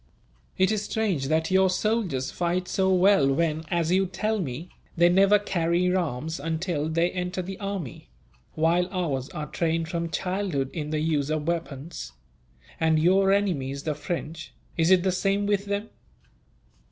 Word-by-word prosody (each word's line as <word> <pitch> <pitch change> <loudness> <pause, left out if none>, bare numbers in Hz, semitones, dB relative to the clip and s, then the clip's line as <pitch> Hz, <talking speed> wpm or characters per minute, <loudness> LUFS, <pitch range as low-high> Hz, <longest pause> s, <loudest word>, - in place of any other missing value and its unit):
"It 190 +2 +3
is 215 -2 0
strange 200 -10 -1
that 160 +3 +1
your 190 0 +4
soldiers 185 - 0
fight 180 +1 -1
so 190 -1 +1
well 185 -6 +4
when, 160 +2 0
as 170 -1 0
you 190 +1 +3
tell 215 +4 -1
me, 160 +1 -5 0.3
they 170 +1 +6
never 195 +3 +5
carry 180 -2 0
arms 160 -3 -2
until 160 0 -2
they 165 +2 +1
enter 180 0 -3
the 190 +2 -7
army; 195 - -5 0.5
while 170 +3 +2
ours 150 -9 -2
are 155 -5 -5
trained 165 0 -1
from 170 -1 -2
childhood 180 -5 -2
in 150 -3 -4
the 155 0 -1
use 150 -3 0
of 155 0 -2
weapons. 160 - -4 0.7
And 160 -1 +3
your 190 +4 +4
enemies, 145 -9 0
the 155 - -1
French, 160 -2 -5 0.2
is 165 -1 +2
it 185 -2 +5
the 190 - +2
same 195 +2 0
with 205 -1 +1
them?" 205 +2 -3
170 Hz, 160 wpm, -26 LUFS, 155-190 Hz, 0.7 s, they